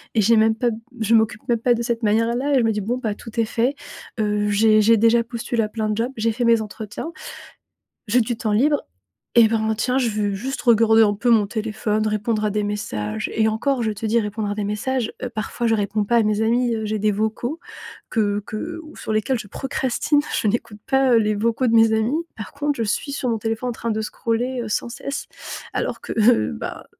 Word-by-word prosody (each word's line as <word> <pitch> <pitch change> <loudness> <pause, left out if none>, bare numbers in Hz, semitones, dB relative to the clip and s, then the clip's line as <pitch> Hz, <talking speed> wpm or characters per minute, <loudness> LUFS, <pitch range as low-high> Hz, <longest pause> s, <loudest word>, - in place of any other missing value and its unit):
et 220 - +4
j'ai 225 +3 +4
même 220 0 +4
pas 240 +1 +1
b - - -4 0.3
je 220 +1 +2
m'occupe 220 -1 +2
même 235 -1 +2
pas 245 +1 +3
de 235 - -3
cette 235 -1 -2
manière-là 235 +6 +1
et - - +5
je - - +2
me 225 - +2
dis: 210 -1 -2
«Bon 235 +5 -1
bah, 225 -4 -2
tout 230 +1 -12
est 230 - +3
fait». 240 +5 0 0.5
Heu, 210 0 0
j'ai 215 +1 +4
j'ai 230 +2 +5
déjà 230 +2 +4
postulé 235 0 -2
à 210 - -3
plein 215 0 -2
de 210 - -1
jobs, 235 +3 -1
j'ai 225 +1 +1
fait 240 +2 -1
mes 230 -1 +4
entretiens. 215 +8 -6 1.0
J'ai 240 +4 +3
du 225 +1 -2
temps 220 -2 -2
libre. 290 +6 +2 0.5
Et 230 - +8
ben, 220 -1 0
tiens, 250 +2 0
je 255 -3 +2
vais 210 -1 -1
juste 260 +7 -4
regarder 225 -2 +5
un 205 - +3
peu 230 +4 -1
mon 215 -3 +5
téléphone, 215 0 -1
répondre 215 0 -1
à 210 - 0
des 210 +1 -1
messages. 110 - -3
Et 220 0 +3
encore 245 +3 0
je 220 - 0
te 215 +1 -6
dis, 230 +2 +2
répondre 210 0 -3
à 205 - -2
des 210 - -2
messages, 230 +3 -2
heu, 255 - -1
parfois, 235 +1 -3
je 225 - +3
réponds 205 0 -1
pas 235 - +1
à 230 - +4
mes 210 0 +1
amis, 235 +2 +2
heu, 220 -1 -3
j'ai 215 0 -2
des 210 0 +2
vocaux 220 +9 -2 0.5
que 205 -2 0
que 330 +10 -5
ou 310 - -13
sur - - -5
lesquels 215 +4 +1
je 210 - -8
procrastine, 270 +3 0 0.2
je - - 0
n'écoute 220 0 -2
pas, 265 -1 +3
heu, - - +6
les 215 -1 +1
vocaux 230 +4 0
de 230 - +2
mes 225 -1 +6
amis. 220 +6 +1 0.2
Par 215 - -8
contre, 290 +1 -1
je 230 - 0
suis 250 +7 -2
sur 265 -2 -2
mon 225 - 0
téléphone 225 +3 -2
en - - -3
train 230 0 -3
de 220 - -1
scroller, 240 +3 -2
heu, 220 - -6
sans 215 - -1
cesse 275 +4 -5 0.5
alors - - -2
que - - -5
heu, 210 - +4
bah 70 - -6
225 Hz, 240 wpm, -22 LUFS, 215-240 Hz, 1.0 s, Et